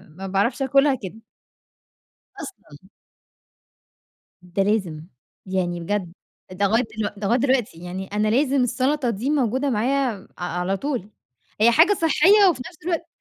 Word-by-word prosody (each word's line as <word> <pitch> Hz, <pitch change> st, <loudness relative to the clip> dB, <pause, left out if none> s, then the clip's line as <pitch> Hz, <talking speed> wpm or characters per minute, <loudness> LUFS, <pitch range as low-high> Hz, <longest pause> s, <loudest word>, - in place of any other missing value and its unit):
ما 185 Hz, +5 st, -10 dB
باعرفش 200 Hz, +9 st, 0 dB
آكلها 275 Hz, +1 st, +3 dB
كده. 190 Hz, +1 st, -6 dB, 1.2 s
أصلًا. 185 Hz, -, -11 dB, 1.5 s
ده 180 Hz, +2 st, -1 dB
لازم، 190 Hz, -7 st, -1 dB, 0.4 s
يعني 180 Hz, -2 st, -2 dB
بجد، 180 Hz, 0 st, -3 dB, 0.4 s
ده 195 Hz, +2 st, 0 dB
لغاية 225 Hz, +5 st, +2 dB, 0.2 s
دلوق 210 Hz, -1 st, -2 dB
ده 200 Hz, -, -3 dB
لغاية 235 Hz, +5 st, +3 dB
دلوقتي، 255 Hz, -9 st, 0 dB
يعني 180 Hz, +2 st, -6 dB
أنا 210 Hz, +1 st, +1 dB
لازم 270 Hz, +3 st, +2 dB
السلطة 255 Hz, +1 st, 0 dB
دي 230 Hz, +6 st, -2 dB
موجودة 265 Hz, -1 st, +1 dB
معايا 250 Hz, 0 st, 0 dB
م -, -, -17 dB
ع 175 Hz, -, -4 dB
على 185 Hz, +2 st, -1 dB
طول، 245 Hz, -5 st, -4 dB, 0.5 s
هي 230 Hz, -, +6 dB
حاجة 330 Hz, -, +6 dB
صحّية 350 Hz, +6 st, +5 dB
وفي 265 Hz, -7 st, -4 dB
نفْس 345 Hz, -, -17 dB
الوقت 335 Hz, -1 st, -2 dB
225 Hz, 145 wpm, -23 LUFS, 190-275 Hz, 1.5 s, هي